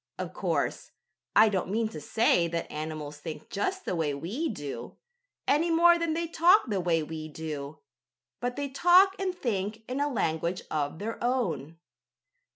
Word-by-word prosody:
Of - - -5
course - - -1 0.5
I 220 - +8
don't 190 -3 -1
mean 220 +3 +1
to 155 -7 -8
say 180 - +3
that 170 0 -4
animals 150 -1 -5
think 155 +1 -8
just 370 - -2
the - - -1
way 155 -4 0
we 210 - -3
do, 140 - -6 0.5
any 320 +4 +3
more 340 +1 +6
than 335 -2 0
they 335 +1 -1
talk 345 +5 +5
the 205 -6 -1
way 165 -2 +1
we 155 0 -6
do. 150 -1 -6 0.6
But 245 0 -2
they 285 0 -2
talk 360 +7 +5
and 370 -2 -2
think 215 - -2
in 255 +2 -3
a 290 +1 +1
language 170 - -1
of 150 0 -1
their 225 +6 -5
own. 170 - -1
200 Hz, 165 wpm, -28 LUFS, -, 0.6 s, I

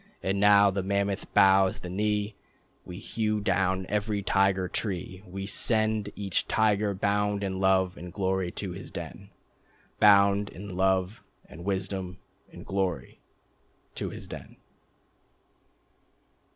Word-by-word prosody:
And 95 +1 0
now 100 0 +6
the 100 0 -1
mammoth 100 +1 -1
bows 95 -1 +5
the 90 - -8
knee, 105 +2 -1 0.5
We 90 - -8
hew 110 +1 -2
down 95 -1 0
every 105 0 -1
Tiger 95 -1 +2
Tree, 95 -2 -4
We 95 +2 -6
send 110 0 0
each 100 -2 -1
tiger 105 -2 +2
bound 100 +1 0
in 95 -1 -2
love 95 -1 +2
and 90 0 -8
glory 95 -1 -1
to 95 -3 -4
his 90 +2 -8
den, 100 0 -8 0.7
Bound 100 0 +5
in 100 +2 -9
love... 95 +2 +1 0.2
and 85 +2 -11
wisdom... 95 -1 -3 0.3
and 85 - -11
glory,... 95 -3 -2 0.7
to - - -4
his - - -9
den." - - -10
100 Hz, 125 wpm, -28 LUFS, 95-105 Hz, 0.7 s, now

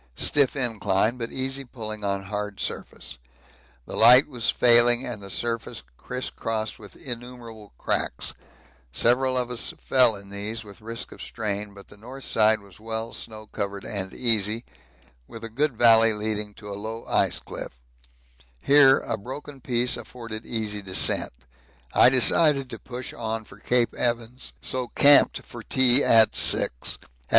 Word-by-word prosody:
Stiff 140 -2 +2
incline, 115 -2 +1
but 115 0 -4
easy 135 +1 -3
pulling 110 -4 -8
on 100 -1 -2
hard 105 0 -5
surface 65 - -6 0.7
the - - -8
light 125 +4 +7
was 120 -6 -2
failing 120 +1 +4
and 105 - -5
the 100 - -9
surface 115 - -4
criss 125 - -5
crossed 110 -1 -4
with 105 -2 -12
innumerable 120 -3 -8
cracks; - - -3 0.6
several 130 - +2
of 125 -1 -1
us 120 - -3
fell 125 -4 +3
in 100 0 -12
these 105 +3 -5
with 105 +1 -14
risk 115 +1 -6
of - - -11
strain, 105 -2 -4
but 100 - -14
the - - -15
north 130 +5 -10
side 110 -1 +2
was 100 0 -15
well 110 +1 -5
snow 110 -1 -8
covered 100 -2 -5
and 95 -2 -3
easy, 115 -1 +1 0.6
with 115 - -11
a 115 - -6
good 135 +2 -1
valley 115 -1 +6
leading 105 -1 -3
to 105 - -12
a - - -4
low 110 +3 -7
ice - - +1
cliff - - -9 0.8
here 140 - +6
a 115 - -3
broken 135 +5 -9
piece 120 0 0
afforded 115 -1 -8
easy 105 -3 -2
descent. 95 -1 +2 0.6
I - - +6
decided 135 +1 +3
to - - -7
push 125 0 -8
on 110 -1 -4
for 95 - -16
Cape 120 +2 +1
Evans, 120 +1 -2
so 130 -1 -2
camped 145 -1 +5
for - - -10
tea 130 +1 +4
at 110 -1 +5
6. - - +4
At - - -5
6. - - -5
115 Hz, 160 wpm, -24 LUFS, 105-125 Hz, 0.8 s, light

